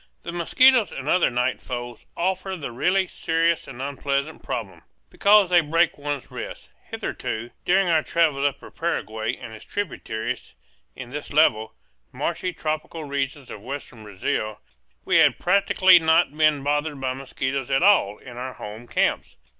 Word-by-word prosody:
The 170 - -5
mosquitoes 235 +8 +4
and - - -7
other 180 - +3
night 125 +1 -1
foes 120 -1 -7
offer 190 +2 -1
the 140 -6 -6
really 185 +10 +1
serious 165 -1 0
and 130 -2 -10
unpleasant 140 +2 -2
problem, 95 -8 -5 0.3
because 200 -2 +5
they 175 -1 +6
break 165 +2 +2
one's 145 -2 -5
rest. - - -8 0.2
Hitherto, 120 +2 -4
during 190 +1 +3
our 160 -2 +3
travels 155 -4 +1
up 140 0 -4
the - - -13
Paraguay 110 -8 -2
and 110 - -10
its 110 - -11
tributaries, 125 - -4 0.4
in 120 - -9
this 145 +1 -6
level, 110 -8 +3 0.4
marshy 170 +7 -2
tropical 155 0 -4
region 140 0 -3
of 105 - -10
western 125 -1 -7
Brazil, 105 +1 -3 0.5
we - - +3
had - - +5
practically 185 -1 +5
not 160 -2 +3
been 155 -2 +3
bothered 145 0 -1
by 130 -1 -1
mosquitoes 135 0 -3
at 135 +4 +2
all, 185 - +4
in 120 -1 -12
our 130 +1 -5
home 110 +3 -9
camps. - - 0
145 Hz, 155 wpm, -24 LUFS, 125-170 Hz, 0.5 s, they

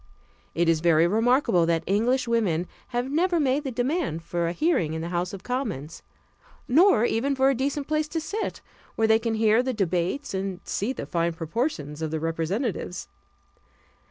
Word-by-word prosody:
It 170 0 +2
is 165 -1 +3
very 165 0 +4
remarkable 220 -3 +3
that 165 -1 +1
English 235 +6 +1
women 200 -8 +1 0.2
have 245 +1 -2
never 345 +3 +2
made 280 0 +1
the 275 - -3
demand 245 - -1
for 170 0 -2
a - - -1
hearing 180 - +1
in 160 - -3
the 170 - -4
House 175 +1 -1
of 195 - -8
Commons, 215 - -4 0.7
nor 300 - +5
even 270 +5 0
for 265 +1 +4
a - - +1
decent 275 +2 -2
place 305 0 0
to 325 +2 -3
sit, 410 +7 -4 0.3
where 225 - +2
they 220 0 +5
can 225 -1 -1
hear 220 +1 +4
the 255 0 -2
debates 185 - -1
and 190 -1 -3
see 210 +6 -2
the - - -5
fine 170 -1 0
proportions 165 - -3
of 160 - -1
the 160 0 -2
representatives. 180 - -3
220 Hz, 180 wpm, -25 LUFS, 170-265 Hz, 0.7 s, nor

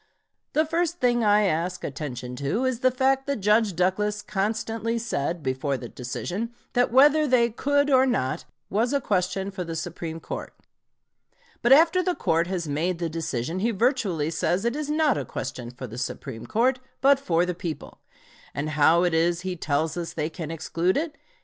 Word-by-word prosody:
The 310 +1 +3
first 340 +2 -1
thing 240 -1 +2
I 210 0 +4
ask 180 0 -1
attention 125 -4 -5
to 145 - -1
is 255 -3 0
the 255 0 +4
fact 265 +2 +1
that 280 - 0
Judge 210 -1 +3
Douglas 205 +4 0
constantly 220 +3 -1
said, 175 -8 -2
before 135 +1 -1
the 120 -2 -8
decision, 180 - -4 0.2
that 245 -1 +2
whether 295 +4 +6
they 240 -3 +3
could 285 +4 +1
or 260 0 +5
not, 130 - -1 0.2
was 230 +6 0
a 280 - +3
question 195 -3 -1
for 190 -2 -4
the 165 -1 -5
Supreme 165 0 -5
Court. - - -7 1.1
But 240 - +2
after 330 +6 +6
the 360 -1 0
court 165 +1 +1
has 180 -3 -3
made 165 +5 -1
the 170 -1 -2
decision 160 0 -3
he 225 +5 +1
virtually 200 - +1
says 180 +4 0
it 235 +2 0
is 300 -1 -3
not 305 -2 +2
a - - -2
question 125 -2 -5
for 125 +1 -8
the 120 0 -7
Supreme 130 -2 -5
Court, 255 +4 +2 0.2
but 275 0 +5
for 175 -9 +1
the 180 - -2
people. 170 -2 -6 0.6
And 150 +2 -2
how 160 +3 +4
is 170 0 +2
it - - -8
he 185 -1 -3
tells 155 0 -1
us 170 -1 -4
they 155 0 -2
can 160 -3 -6
exclude 165 +3 0
it? 315 +1 -2
190 Hz, 185 wpm, -25 LUFS, 160-250 Hz, 1.1 s, whether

